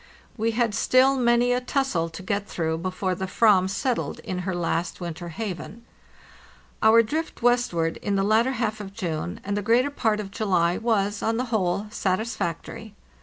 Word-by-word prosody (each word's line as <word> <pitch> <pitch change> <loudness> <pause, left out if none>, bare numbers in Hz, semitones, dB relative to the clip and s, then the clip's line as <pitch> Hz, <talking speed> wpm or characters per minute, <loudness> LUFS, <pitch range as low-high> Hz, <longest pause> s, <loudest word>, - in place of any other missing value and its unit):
We 225 0 0
had 230 -2 +1
still 255 +4 +4
many 240 -1 +3
a 250 - 0
tussle 250 -11 0
to 165 +3 -9
get 200 +2 -2
through 160 -1 -2
before 185 +1 -2
the 190 +1 -4
ram 200 -5 +5
settled 240 +5 -2
in 185 -1 -4
her 185 0 -3
last 170 0 -2
winter 175 -1 -6
haven. 210 +4 -6 1.0
Our 225 +1 +6
drift 310 +2 -4
westward 240 -10 +2
in 200 -1 -2
the 195 - +2
latter 225 +6 +3
half 220 -3 -2
of 195 -1 -9
June 175 -4 -3
and 200 +1 -2
the 205 - -1
greater 240 +7 +2
part 220 -6 0
of 200 -2 -6
July 180 -5 +1
was, 205 -3 0
on 225 0 0
the 250 - -1
whole, 195 -1 +1
satisfactory. 205 0 -3
205 Hz, 170 wpm, -25 LUFS, 185-235 Hz, 1.0 s, Our